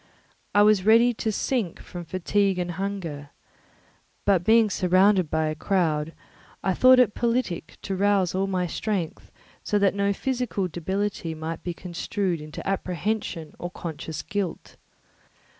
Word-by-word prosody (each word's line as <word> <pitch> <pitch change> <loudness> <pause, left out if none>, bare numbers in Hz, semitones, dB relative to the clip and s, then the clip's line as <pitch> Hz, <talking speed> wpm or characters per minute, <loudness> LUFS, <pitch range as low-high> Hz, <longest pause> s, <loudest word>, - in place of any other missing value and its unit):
I 205 - +7
was 210 -3 +4
ready 230 +3 +5
to 220 0 -2
sink 215 -4 -1
from 175 -1 -8
fatigue 190 +3 0
and 175 -1 -2
hunger, 170 -6 -4 1.0
but 190 -4 +3
being 220 +1 +4
surrounded 185 -1 +3
by 160 +1 +1
a 155 - -1
crowd, 160 -2 0 0.5
I 190 - +2
thought 255 +6 +7
it 245 -4 +4
politic 235 -9 -1
to 195 - -2
rouse 195 -2 +2
all 190 +1 0
my 185 -2 0
strength, 185 -1 -3 0.4
that 200 -2 +3
no 200 0 +1
physical 245 -4 -1
debility 180 0 -3
might 160 +1 -5
be 175 -2 -4
construed 180 0 -3
into 150 0 -8
apprehension 185 -2 -2
or 175 - -4
conscious 160 -3 -6
guilt. 200 -5 -4
190 Hz, 140 wpm, -25 LUFS, 170-205 Hz, 1.0 s, I